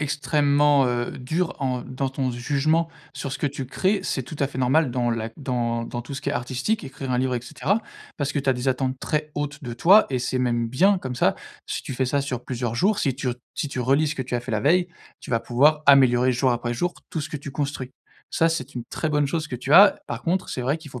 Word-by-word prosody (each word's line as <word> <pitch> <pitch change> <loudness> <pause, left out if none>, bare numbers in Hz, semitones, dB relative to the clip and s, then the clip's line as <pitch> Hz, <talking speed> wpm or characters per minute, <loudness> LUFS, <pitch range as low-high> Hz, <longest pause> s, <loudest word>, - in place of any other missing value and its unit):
extrêmement, 145 0 +3
heu, 120 0 -1
dure 160 +7 -2
en 125 -2 0
dans 130 +2 -3
ton 135 -1 -1
jugement 145 +7 +1 0.3
sur 135 - -5
ce - - -4
que - - 0
tu 140 -1 -4
crées. 190 +10 0
C'est 135 -7 -2
tout 150 - -9
à 140 - +2
fait 135 -1 -8
normal 130 +3 +3
dans 120 -1 0
la 115 -1 -2
dans 120 -4 -1
dans 120 +1 -5
tout 120 - -9
ce 135 - -4
qui - - -3
est - - 0
artistique- 130 - -2
écrire 135 -1 -6
un 125 - +1
livre, 130 0 0
et 120 - -1
cetera- 200 - -1 0.4
parce 145 0 -1
que, 145 - -1
tu 135 -1 +1
as - - +4
des 125 +1 -2
attentes 130 0 -1
très 150 0 -2
hautes 145 0 -4
de 120 - -5
toi 185 - +6
et 130 - 0
c'est 125 +1 -2
même 120 -2 0
bien. 190 - +3
Comme 130 -6 -5
ça, - - +2 0.3
si - - -4
tu 135 - -6
fais 130 +1 0
ça 140 +3 +1
sur 130 -3 -4
plusieurs 120 -2 -3
jours, 200 - +2
si 135 -8 +1
tu 130 -1 -3 0.3
si 145 - -2
tu 130 - -4
relis 140 +5 +2
ce 155 - -2
que - - -5
tu 125 - -5
as 120 - +1
fait 120 - -7
la 105 - +1
veille, 175 +7 +3 0.3
tu - - -10
vas 115 - +2
pouvoir 145 +7 +3
améliorer, 130 -2 +6
jour 125 +1 +2
après 120 0 -2
jour, 175 +8 -1 0.2
tout 160 - -3
ce 145 - -6
que 150 - -4
tu 140 0 -8
construis. 135 -2 -4 0.4
Ça, 165 - +3
c'est 140 -4 -4
une 120 - -5
très 155 - -2
bonne 150 -1 +2
chose 155 +2 -2
que 125 - -5
tu 130 +4 -3
as. 200 +4 +8
Par 120 0 -5
contre, 180 +3 0
c'est 130 - -3
vrai 140 +5 +1
qu'il 160 -3 -12
faut 125 - -8
135 Hz, 265 wpm, -24 LUFS, 125-150 Hz, 0.4 s, as